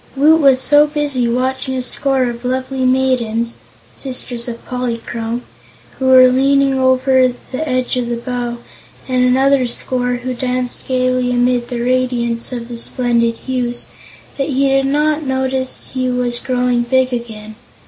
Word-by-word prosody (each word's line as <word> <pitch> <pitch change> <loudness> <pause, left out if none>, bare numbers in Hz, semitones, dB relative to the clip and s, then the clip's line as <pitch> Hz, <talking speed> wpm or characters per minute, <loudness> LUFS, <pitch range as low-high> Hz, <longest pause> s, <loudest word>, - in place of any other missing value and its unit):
Woot 310 +4 +4
was 270 -2 +5
so 290 +3 +5
busy 290 -5 -1
watching 260 +2 -1
a 255 - -1
score 270 +1 +1
of 240 -1 -4
lovely 260 +1 -2
maidens 245 -3 0 0.4
sisters 250 -2 -3
of 235 -1 -7
Polychrome 235 -1 -4 0.6
who 265 - 0
were 255 -1 +8
leaning 275 +2 +3
over 260 -1 +3 0.2
the 285 +4 -3
edge 255 0 0
of 240 -1 -2
the 240 - -1
bow, 240 0 -4 0.5
and 255 -1 +1
another 260 +1 +3
score 245 +1 -2
who 250 +1 -4
danced 250 0 -3
gaily 255 -1 +1
amid 245 0 +1
the 240 -1 -4
radiance 245 -2 0
of 240 -2 -5
the 240 -1 -6
splendid 235 -2 +1
hues, 245 -2 -2 0.5
that 275 - -1
he 275 0 +1
did 270 0 +2
not 300 +2 +1
notice 265 -1 -2
he 255 -1 -1
was 245 -1 0
growing 250 -1 0
big 255 +1 +1
again. 220 -3 -6
255 Hz, 150 wpm, -16 LUFS, 245-265 Hz, 0.6 s, were